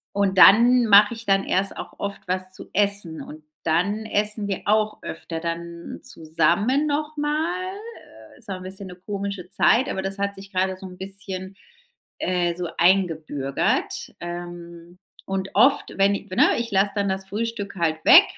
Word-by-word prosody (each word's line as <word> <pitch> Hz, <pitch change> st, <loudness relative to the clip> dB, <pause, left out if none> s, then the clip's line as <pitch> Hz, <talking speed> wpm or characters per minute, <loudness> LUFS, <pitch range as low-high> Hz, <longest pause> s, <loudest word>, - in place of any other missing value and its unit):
Und 200 Hz, -1 st, +1 dB
dann 235 Hz, +6 st, +7 dB
mache 205 Hz, +1 st, +6 dB
ich 230 Hz, 0 st, -9 dB
dann 195 Hz, 0 st, +3 dB
erst 195 Hz, +2 st, 0 dB
auch -, -, -7 dB
oft 200 Hz, -1 st, -5 dB
was 185 Hz, 0 st, -2 dB
zu -, -, -9 dB
essen. 200 Hz, -5 st, +1 dB
Und 155 Hz, 0 st, -11 dB, 0.2 s
dann 190 Hz, +7 st, 0 dB
essen 210 Hz, -1 st, 0 dB
wir 195 Hz, -2 st, -3 dB
auch 215 Hz, 0 st, +1 dB
öfter 165 Hz, -1 st, -5 dB
dann 170 Hz, 0 st, -6 dB
zusammen 175 Hz, -, 0 dB
noch 300 Hz, +1 st, -2 dB
mal. 325 Hz, +6 st, -1 dB, 0.6 s
Äh, -, -, -20 dB
ist -, -, -17 dB
auch 195 Hz, -, -2 dB
ein 185 Hz, -, -9 dB
bisschen 190 Hz, +1 st, -8 dB
'ne 180 Hz, -, -10 dB
komische 200 Hz, -3 st, -5 dB
Zeit, 235 Hz, +6 st, +3 dB
aber 190 Hz, -, -2 dB
das 195 Hz, +1 st, -4 dB
hat 200 Hz, 0 st, -2 dB
sich 195 Hz, 0 st, -12 dB
gerade 190 Hz, 0 st, 0 dB
so 190 Hz, -, -11 dB
'n 180 Hz, 0 st, -12 dB
bisschen, 190 Hz, 0 st, -7 dB, 0.6 s
äh, 175 Hz, -2 st, 0 dB
so, 175 Hz, -1 st, -4 dB
eingebürgert. 160 Hz, -7 st, 0 dB
Ähm, 175 Hz, 0 st, -8 dB, 0.3 s
und 195 Hz, 0 st, -3 dB
oft, 255 Hz, +7 st, +4 dB
wenn 200 Hz, +1 st, +3 dB
i 200 Hz, -, -7 dB
we 185 Hz, -, -6 dB
ne, -, -, +4 dB
ich 235 Hz, -1 st, -3 dB
lasse 200 Hz, +1 st, +2 dB
dann 200 Hz, -1 st, 0 dB
das 190 Hz, 0 st, -3 dB
Frühstück 210 Hz, 0 st, -4 dB
halt 160 Hz, -3 st, -1 dB
weg. -, -, +10 dB
195 Hz, 175 wpm, -23 LUFS, 175-210 Hz, 0.6 s, weg